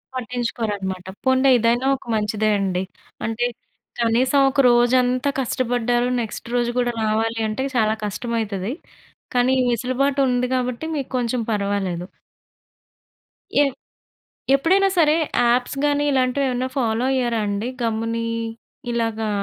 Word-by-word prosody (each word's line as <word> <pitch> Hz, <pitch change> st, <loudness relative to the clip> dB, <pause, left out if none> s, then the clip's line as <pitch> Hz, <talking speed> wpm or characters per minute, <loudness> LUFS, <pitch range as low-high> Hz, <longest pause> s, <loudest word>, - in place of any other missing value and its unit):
పట్టించుకోరనమాట. 225 Hz, -6 st, -3 dB, 0.2 s
పోనిలే 260 Hz, +1 st, +4 dB
ఇదైనా 240 Hz, +3 st, +2 dB
ఒక -, -, -19 dB
మంచిదే 215 Hz, 0 st, 0 dB
అండి. 190 Hz, -2 st, -1 dB, 0.4 s
అంటే 225 Hz, +2 st, -1 dB, 0.6 s
కనీసం 245 Hz, +4 st, +3 dB
ఒక 270 Hz, -, -2 dB
రోజంతా 250 Hz, +2 st, +3 dB
కష్టపడ్డారు, 245 Hz, -1 st, 0 dB
నెక్స్ట్ 225 Hz, 0 st, -6 dB
రోజు 240 Hz, -1 st, +1 dB
కూడా 245 Hz, -1 st, +1 dB
రావాలి 225 Hz, +1 st, 0 dB
అంటే 215 Hz, +5 st, -2 dB
చాలా 220 Hz, -2 st, +3 dB
కష్టమైతది. 215 Hz, -1 st, -3 dB, 0.6 s
కానీ 245 Hz, +1 st, +3 dB
ఈ -, -, +2 dB
వెసులుబాటు 255 Hz, +4 st, 0 dB
ఉంది 250 Hz, 0 st, +1 dB
కాబట్టి 250 Hz, +3 st, -2 dB
మీకు 275 Hz, -3 st, -3 dB
కొంచెం 245 Hz, 0 st, -1 dB
పర్వాలేదు. 200 Hz, -4 st, -1 dB, 1.5 s
ఏ 290 Hz, -, +7 dB, 0.9 s
ఎప్పుడైనా 380 Hz, +8 st, +3 dB
సరే 310 Hz, -2 st, +5 dB, 0.3 s
యాప్స్ 245 Hz, +3 st, +1 dB
గాని 290 Hz, 0 st, +2 dB
ఇలాంటివి 260 Hz, +1 st, +1 dB
ఏమన్నా 250 Hz, +1 st, -1 dB
ఫాలో 230 Hz, -1 st, +1 dB
అయ్యారా 240 Hz, -3 st, 0 dB
అండి 205 Hz, +4 st, -2 dB
గమ్ముని 230 Hz, 0 st, -1 dB, 0.7 s
ఇలాగా 225 Hz, -2 st, -1 dB
240 Hz, 115 wpm, -22 LUFS, 220-255 Hz, 1.5 s, ఏ